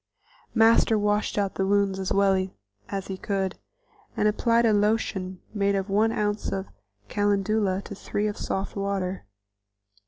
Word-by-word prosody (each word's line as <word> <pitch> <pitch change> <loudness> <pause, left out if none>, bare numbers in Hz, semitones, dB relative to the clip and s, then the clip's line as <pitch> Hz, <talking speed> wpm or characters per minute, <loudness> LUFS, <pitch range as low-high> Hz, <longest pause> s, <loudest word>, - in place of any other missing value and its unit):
Master 225 0 +5
washed 210 0 0
out 200 -2 0
the 190 - -1
wounds 200 -1 +2
as 190 - -3
well 195 -1 +3 0.4
as 195 -1 -3
he 190 - -5
could, 195 -1 -2 0.6
and 210 - +3
applied 230 +2 +3
a 220 - +4
lotion 205 -3 0
made 200 -1 +1
of 195 0 -2
one 215 +3 +3
ounce 210 -1 -1 0.6
calendula 205 - +1
to - - -8
three 205 +1 -3
of 210 -1 -1
soft 195 +1 -3
water. 195 - -2
200 Hz, 145 wpm, -26 LUFS, 195-210 Hz, 0.6 s, Master